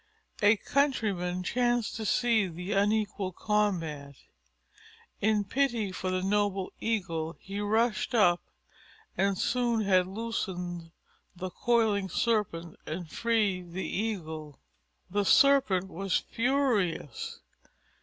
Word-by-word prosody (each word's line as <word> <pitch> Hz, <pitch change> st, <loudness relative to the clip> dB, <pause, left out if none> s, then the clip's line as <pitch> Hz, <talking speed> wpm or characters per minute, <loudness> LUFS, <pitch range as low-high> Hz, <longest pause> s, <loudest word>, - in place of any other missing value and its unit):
A 210 Hz, +1 st, +5 dB
Countryman 200 Hz, -10 st, 0 dB
chanced 240 Hz, +1 st, 0 dB
to 220 Hz, -2 st, -3 dB
see 230 Hz, -3 st, +2 dB
the 180 Hz, +3 st, -6 dB
unequal 205 Hz, -1 st, +1 dB
combat. 165 Hz, -10 st, -1 dB, 1.0 s
In 210 Hz, 0 st, +2 dB
pity 235 Hz, -2 st, 0 dB
for 185 Hz, 0 st, -3 dB
the 185 Hz, 0 st, -1 dB
noble 200 Hz, -1 st, 0 dB
Eagle 170 Hz, -7 st, -2 dB
he 195 Hz, +1 st, -6 dB
rushed 220 Hz, +2 st, +1 dB
up 175 Hz, -6 st, +4 dB, 0.7 s
and 195 Hz, 0 st, +1 dB
soon 240 Hz, -1 st, +1 dB
had 185 Hz, -3 st, +3 dB
loosened 185 Hz, -5 st, -4 dB, 0.5 s
the 185 Hz, +1 st, -5 dB
coiling 215 Hz, -3 st, +1 dB
Serpent 180 Hz, -6 st, -1 dB
and 165 Hz, 0 st, -5 dB
freed 200 Hz, -7 st, 0 dB
the 190 Hz, -, -3 dB
Eagle. 160 Hz, -9 st, -4 dB, 0.5 s
The 205 Hz, +1 st, +1 dB
Serpent 205 Hz, -6 st, +4 dB
was 195 Hz, +1 st, -1 dB
furious. 230 Hz, -, -1 dB
200 Hz, 105 wpm, -29 LUFS, 180-225 Hz, 1.0 s, A